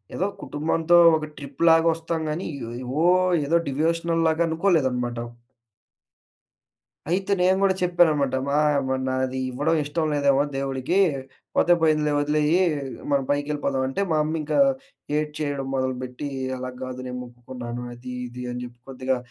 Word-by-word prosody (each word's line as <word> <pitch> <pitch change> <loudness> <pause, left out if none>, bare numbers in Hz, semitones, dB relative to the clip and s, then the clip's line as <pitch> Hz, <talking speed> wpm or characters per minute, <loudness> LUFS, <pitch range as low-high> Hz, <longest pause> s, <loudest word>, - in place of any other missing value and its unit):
ఏదో 185 - 0 0.2
కుటుంబంతో 160 +3 +1 0.2
ఒక 155 - -4
ట్రిప్‌లాగొస్తాం 165 +3 +2
గానీ, 170 +5 -3
ఇ - - -8 0.2
ఇ - - -6 0.2
ఓ - - +5 0.4
ఏదో 165 +4 +3
డివోషనల్‌లాగా 165 +2 +1
అనుకోలేదనమాట. 135 -9 +1 1.9
అయితే, 190 +2 0
నేను 185 +1 +4
గూడా 195 -1 +4
చెప్పాననమాట. 160 -7 +3
మా, 140 - +1 0.3
మరి 130 0 0
నాదీ 130 0 -1
ఇవ్వడం 145 +6 0
ఇష్టం 155 +2 -1
లేదేమో 140 -1 +3
దేవుడికీ. 135 +4 -2 0.6
పోతే 175 - +4
పోయిందిలే 155 -2 +2
వొదిలెయ్యీ. 150 +4 +2 0.5
మనం 140 -1 +2
పైకెళ్ళిపోదాం 145 -2 -1
అంటే, 135 +9 -2
మా 155 - +2
అమ్మ 160 +1 -2
ఇంకా 155 - -1 0.6
ఏడ్చేయడం 150 -2 -3
మొదలు 130 -1 -1
పెట్టీ, 130 +3 -5 0.3
"అలాగ్గాదు 130 0 -6
నేను 125 0 -5
మొక్కుకున్నాను." 120 0 -8
అదీ 125 +1 -9 0.2
ఇదీ 125 +1 -8
అని 125 - -5
జెప్పి 120 -1 -12
కొద్దిగా 130 0 -1
145 Hz, 130 wpm, -24 LUFS, 130-165 Hz, 1.9 s, ఓ